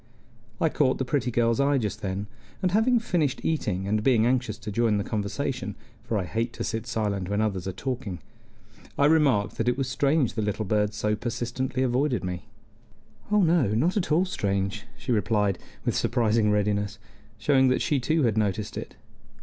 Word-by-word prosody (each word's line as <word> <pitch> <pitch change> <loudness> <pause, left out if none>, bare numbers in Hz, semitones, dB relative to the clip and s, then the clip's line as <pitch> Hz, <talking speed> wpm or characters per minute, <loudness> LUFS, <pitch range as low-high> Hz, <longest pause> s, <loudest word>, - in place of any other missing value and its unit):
I 160 - +3
caught 145 -4 +2
the 130 - -2
pretty 125 -1 0
girl's 115 +1 +1
eye 140 0 +3
just 105 -3 -3
then, 95 +1 -3 0.4
and 185 - +2
having 225 +5 +4
finished 170 - 0
eating, 100 - -1
and 105 +1 +1
being 115 -3 +4
anxious 125 -3 0
to 105 - -6
join 110 0 +2
the 100 - -1
conversation, 105 +1 -3 0.3
for 115 -2 -1
I 100 - 0
hate 115 +6 -2
to - - -4
sit 115 +1 -3
silent 105 -5 -1
when 100 +1 0
others 95 -4 -1
are - - -1
talking. 120 -2 -4 0.8
I 140 - +4
remarked 145 -10 +3
that - - -1
it 125 - 0
was 135 -2 -1
strange 140 0 +1
the 110 - -2
little 105 +1 -1
birds 105 +1 0
so 105 0 +1
persistently 120 +3 -2
avoided 130 0 +1
me. 90 -1 -4 0.9
"Oh 210 -1 +4
no, 165 - +3
not 165 +11 +2
at 195 -6 -1
all 170 +5 +4
strange," 100 - -2
she 130 - -4
replied, 105 -3 +1 0.3
with - - +1
surprising 115 -3 +2
readiness, 105 0 0 0.4
showing 130 +2 +3
that 130 - +2
she 145 - +1
too 155 +5 +1
had 110 -3 +2
noticed 105 0 -1
it. - - -7
115 Hz, 185 wpm, -26 LUFS, 105-135 Hz, 0.9 s, having